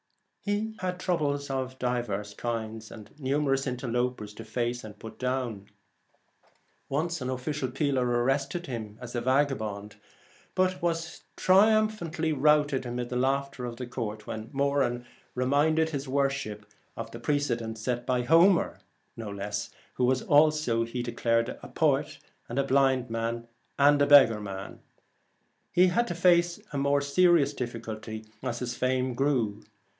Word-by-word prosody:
He 210 +2 -1
had 180 -1 -3
troubles 145 -6 -1
of 130 -1 -3
divers 120 -5 -2
kinds, 110 -1 -4
and 105 -2 -11
numerous 135 0 0
interlopers 125 -3 -2
to 115 - -9
face 120 +2 -2
and 105 -1 -10
put 110 +1 -10
down. 125 -6 -2 1.2
Once 165 +3 -1
an 125 - -2
officious 130 +1 -2
peeler 140 -3 +1
arrested 135 +7 0
him 110 -6 -6
as 125 -1 -8
a 120 - 0
8 - - -5
4 - - -7
vagabond, 110 -8 -1 0.6
but 185 0 +1
was 170 -1 -2
triumphantly 195 -5 +3
routed 145 -1 +3
The - - -13
Last - - -5
amid 120 0 -3
the 125 - -4
laughter 135 0 0
of 120 -1 -5
the 125 - -4
court, 110 -3 -5
when 110 +1 -6
Moran 140 -3 0 0.3
reminded 150 +5 +2
his 140 -2 -4
worship 135 -6 -1 0.3
of 115 0 -6
the 115 - -8
pre 145 +5 +1
cedent 115 -5 -2
set 120 +2 -3
by 125 -1 +1
Homer, 170 +7 +4 0.4
who 105 +3 -5
was 130 +1 +2
also, 150 -6 +3
he 120 +1 -4
declared, 115 -1 0
a - - -9
poet, - - +1 0.3
and 120 - -5
a 140 - +3
blind 135 -3 +2
man, 115 +1 -2 0.3
and 145 +1 +5
a 145 - +4
beggarman. 105 -9 +4 0.9
He 180 - +5
had 235 +7 +1
to 175 - -3
face 175 0 +3
a 140 - -1
more 140 +1 +2
serious 145 0 +4
difficulty 110 -3 -6 0.2
as 120 - -3
his 120 0 -3
fame 130 0 0
grew. 120 -6 0
130 Hz, 150 wpm, -28 LUFS, 115-145 Hz, 1.2 s, and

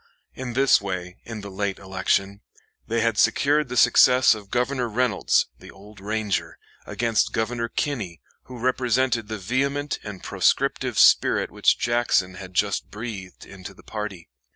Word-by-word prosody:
In 130 -2 -6
this 135 -2 +4
way, 90 -2 -5
in 110 -2 -7
the 100 0 -9
late 100 0 -2
election, 95 +1 -1 0.5
they 115 +1 0
had 115 -2 +1
secured 145 -1 +2
the 125 - -4
success 125 +1 +6
of 105 -2 -10
Governor 125 +1 -1
Reynolds 115 -2 +1
the - - -13
Old 105 +2 -15
Ranger 105 0 -2 0.3
against 115 -2 0
Governor 115 +1 -2
Kinney, 110 - -3 0.3
who 125 - -10
represented 125 -1 0
the 110 0 -4
vehement 140 +8 -1
and 100 -3 -8
proscriptive - - 0
spirit - - +4
which - - +2
Jackson 120 -6 +1
had 90 0 -10
just 100 +1 0
breathed 105 -4 -8
into 95 -2 -11
the - - -18
party. 105 -6 -6
110 Hz, 150 wpm, -24 LUFS, 100-125 Hz, 0.5 s, success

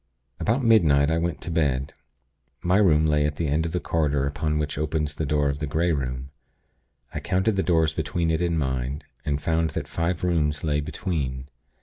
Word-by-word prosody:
"About 120 +5 +1
midnight, 80 - +4
I 80 - +2
went 85 -1 -2
to 85 - -5
bed. 70 -4 0 0.7
My 90 +2 +3
room 80 -7 +4
lay 75 -1 +3
at 75 0 -1
the 80 +1 -1
end 80 +3 +1
of - - -5
the 90 - -1
corridor 75 -5 0
upon 75 +2 -1
which 75 -1 -2
opens 75 0 -1
the 80 -1 -3
door 75 0 +2
of 70 0 -2
the 75 - -2
Grey 85 +4 +1
Room. 65 -2 -3 0.8
I - - -3
counted 95 +8 +1
the 95 - +2
doors 80 -4 +2
between 80 +1 -1
it 80 +1 0
and 85 -1 +1
mine, 65 0 -2 0.2
and 70 -1 0
found 80 +1 +1
that - - -3
five 85 +1 -2
rooms 75 -4 +1
lay 75 -2 +1
between. 70 -4 -3
75 Hz, 200 wpm, -25 LUFS, 70-85 Hz, 0.8 s, midnight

